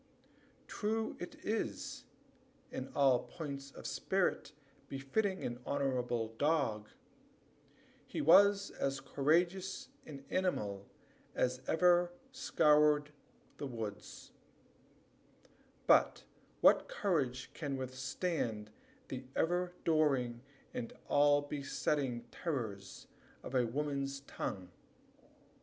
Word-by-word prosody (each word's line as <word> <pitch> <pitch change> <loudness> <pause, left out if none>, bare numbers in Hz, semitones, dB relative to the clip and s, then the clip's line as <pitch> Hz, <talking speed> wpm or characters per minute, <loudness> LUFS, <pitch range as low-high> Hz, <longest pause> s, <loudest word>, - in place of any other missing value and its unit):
True 220 +1 -1
it 175 - -7
is, 210 - -3 0.7
in 130 - -5
all 135 -3 +5
points 140 -4 -7
of - - -12
spirit - - 0 0.4
befitting 185 +9 -1
an 120 0 -3
honorable 125 -5 -1
dog, 140 -9 +1 1.2
he - - -4
was 200 +5 +6
as 135 0 -2
courageous 170 +8 0 0.2
an 140 -2 -9
animal 105 - -1 0.5
as 125 0 0
ever 175 +1 +4 0.2
scoured 150 - +3 0.5
the 140 - -4
woods 110 -5 -7 1.5
but - - +4 0.4
what - - +6
courage 130 -10 -1
can 145 -4 -3
withstand 130 -3 -3 0.4
the 130 - -6
ever 175 +2 +1
during 135 -7 +2 0.3
and 115 - -4 0.2
all 145 0 +5
besetting 140 -3 -1
terrors 110 - -4 0.4
of - - -7
a 125 -2 +3
woman's 140 +1 -2
tongue? 95 -9 -5
140 Hz, 90 wpm, -35 LUFS, 125-165 Hz, 1.5 s, was